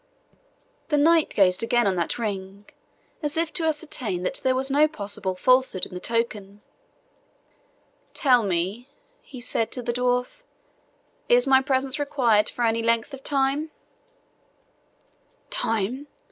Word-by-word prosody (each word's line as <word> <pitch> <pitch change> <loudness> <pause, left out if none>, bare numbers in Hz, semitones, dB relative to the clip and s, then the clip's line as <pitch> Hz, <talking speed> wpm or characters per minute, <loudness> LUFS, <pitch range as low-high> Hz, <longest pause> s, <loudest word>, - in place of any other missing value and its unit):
The 295 - +1
knight 320 +2 +4
gazed 185 -2 +2
again 240 0 +2
on 195 -2 +1
that 170 - -1
ring, 200 -2 -5 0.5
as 300 +1 -2
if 330 -1 -1
to 335 -2 0
ascertain 290 - -2
that 225 - -3
there 260 0 +2
was 265 +1 0
no 295 +2 +4
possible 200 -8 -4
falsehood 255 -2 +2
in - - -13
the 180 - -5
token. 210 -2 -3 1.5
"Tell 255 -5 +4
me," 195 +6 -2 0.3
he 265 - -11
said 230 -2 -2
to 250 - -4
the 240 0 -2
dwarf, 250 - -1 0.9
"is - - +5
my 265 0 +5
presence 265 +1 +1
required 245 -8 +2
for 240 - -2
any 225 0 +1
length 230 +4 0
of 270 - -8
time?" 280 +2 0 1.8
"Time!" 225 +6 -2
245 Hz, 135 wpm, -24 LUFS, 210-280 Hz, 1.8 s, is